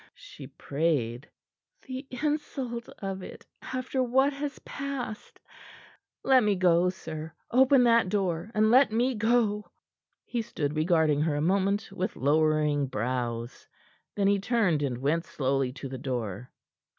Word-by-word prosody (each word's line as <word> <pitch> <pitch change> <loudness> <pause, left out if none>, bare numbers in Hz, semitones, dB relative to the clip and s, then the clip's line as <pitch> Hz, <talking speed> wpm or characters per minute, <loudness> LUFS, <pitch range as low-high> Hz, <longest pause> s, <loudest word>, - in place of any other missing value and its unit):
she - - -11
prayed. 140 -4 -2 0.5
"The 260 +1 -7
insult 265 -4 -3
of 195 -1 -3
it - - -10 0.2
after 255 0 -3
what 265 +3 +2
has 285 +1 -4
passed! 275 -6 -6 0.8
Let 265 -1 +5
me 210 -1 +2
go, 180 -1 +3
sir; 160 -3 -7 0.2
open 260 +1 +5
that 230 -5 +4
door, 185 -2 -1
and 215 +1 +4
let 260 0 +6
me 245 +4 +1
go." 220 -2 +1 0.6
He 240 - -2
stood 155 -10 -3
regarding 155 -2 +2
her 155 -1 +1
a - - -1
moment, 195 +4 +1
with 185 - -3
lowering 150 0 +2
brows. 120 0 -3 0.5
Then 200 - +1
he 200 0 +3
turned, 200 -8 +1
and 130 -4 -1
went 150 +6 0
slowly 135 -4 -1
to 135 - -7
the 130 -1 -7
door. 120 -4 -4
185 Hz, 140 wpm, -28 LUFS, 145-240 Hz, 0.8 s, let